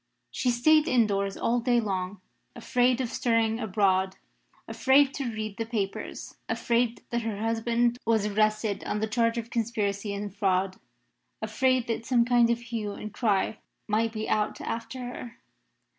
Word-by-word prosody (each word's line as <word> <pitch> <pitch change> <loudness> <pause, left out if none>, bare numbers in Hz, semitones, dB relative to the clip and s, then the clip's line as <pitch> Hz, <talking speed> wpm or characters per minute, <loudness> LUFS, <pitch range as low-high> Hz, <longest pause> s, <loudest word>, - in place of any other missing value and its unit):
She 250 - 0
stayed 305 +6 +4
indoors 200 -6 +1
all 240 +1 +1
day 240 0 +2
long, 190 -3 -3 0.3
afraid 250 0 +2
of 245 - -2
stirring 230 -1 +1
abroad; 190 -3 +1 0.5
afraid 270 +1 +4
to 275 - -3
read 215 -2 -5
the 225 - -2
papers; 205 -4 -4
afraid 235 0 0
that 235 0 0
her 220 -3 -3
husband 230 +2 +1
was 220 -2 +2
arrested 215 0 +1
on - - -1
the 220 - +1
charge 230 +1 +1
of 230 0 -4
conspiracy 210 -3 -1
and 205 0 -5
fraud; 190 -2 +1 0.6
afraid 250 +3 +1
that 230 0 -3
some 240 -2 +3
kind 240 -1 +4
of 235 - +2
hue 225 -3 -4
and 210 0 -7
cry 210 -2 0 0.3
might 220 +2 +1
be 220 -1 -4
out 210 -1 0
after 235 +3 -5
her. 245 -1 -8
225 Hz, 155 wpm, -27 LUFS, 210-240 Hz, 0.6 s, stayed